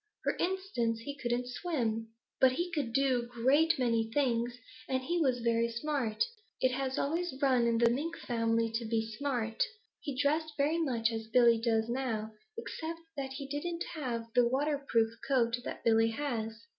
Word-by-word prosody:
For - - +1
instance, 350 - -1
he 285 +4 -5
couldn't 245 -2 -1
swim. 245 -6 -2 0.3
But 260 -1 +6
he 345 +6 -2
could 290 -8 -1
do 265 0 +3
a - - -7
great 265 +7 +3
many 230 -3 +1
things, 240 -3 +1 0.3
and 260 -1 0
he 345 +5 0
was 255 -5 +2
very 230 0 +2
smart. 235 -2 0 0.4
It 255 - +3
has 265 0 -2
always 335 +2 -1
run 255 -4 +3
in 230 -1 +2
the 235 0 +5
Mink 295 +8 -1
family 230 -1 0
to 230 +1 -2
be 225 0 -1
smart. 230 -2 -2 0.4
He 270 -3 -5
dressed 305 +2 +1
very 300 +4 +2
much 235 -7 +1
as 225 -1 -4
Billy 235 0 +5
does 225 -1 +1
now, 235 -3 -2 0.2
except 330 -7 -5
that 270 -2 -4
he 275 0 -6
didn't 335 +5 -3
have 245 -7 -3
the 245 -1 +5
waterproof 270 -4 +1
coat 245 -3 +2
that - - -6
Billy 225 0 +4
has. 225 -3 -3
250 Hz, 170 wpm, -32 LUFS, 230-285 Hz, 0.4 s, But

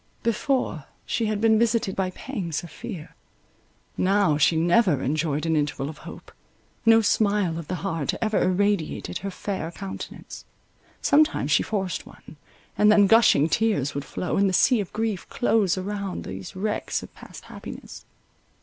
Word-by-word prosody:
Before, 230 - -1 0.2
she 225 - -1
had 210 -1 -1
been 220 0 +4
visited 230 -4 +1
by 190 -1 0
pangs 185 - -5
of 175 - -10
fear—now, 195 -2 -3
she 160 - +4
never 175 - +3
enjoyed 155 +1 -1
an 165 -1 +1
interval 145 -2 -1
of 155 - -10
hope. - - -11 0.6
No 225 0 +7
smile 205 -6 +1
of 165 - -8
the 185 - -2
heart 165 -7 -1
ever 215 -2 +1
irradiated 195 -2 0
her 195 - -4
fair 190 -3 -4
countenance; 190 +2 -8 0.6
sometimes 285 - +3
she 145 - +4
forced 190 -5 -3
one, - - -15 0.4
and 210 0 +5
then 210 -1 +6
gushing 225 -8 +5
tears 165 - +1
would 140 - -3
flow, 180 - -3
and 200 0 +3
the - - -2
sea 240 +6 +4
of 195 - -7
grief 215 -4 -3
close 210 -6 +1
above 200 0 -4
these 95 0 -8
wrecks 210 +3 -2
of - - -12
past - - -12
happiness. - - -10
195 Hz, 155 wpm, -25 LUFS, 165-215 Hz, 0.6 s, No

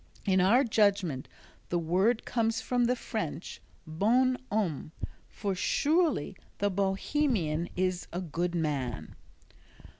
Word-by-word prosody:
In 190 -2 +3
our 230 +9 +5
judgment 200 - +1 0.4
the 175 - +1
word 185 +8 +1
comes 225 -2 0
from 245 -1 +1
the 250 +1 +2
French 205 -8 -5 0.2
"Bon 230 +11 +2 0.2
Homme," 175 -8 -1 0.4
for 200 -2 -3
surely 295 - +1 0.2
the 205 0 +1
Bohemian 195 - 0
is 185 -1 -1
a 175 - -3
"good 175 0 -2
man." 140 -8 -2
195 Hz, 115 wpm, -30 LUFS, 170-230 Hz, 0.4 s, our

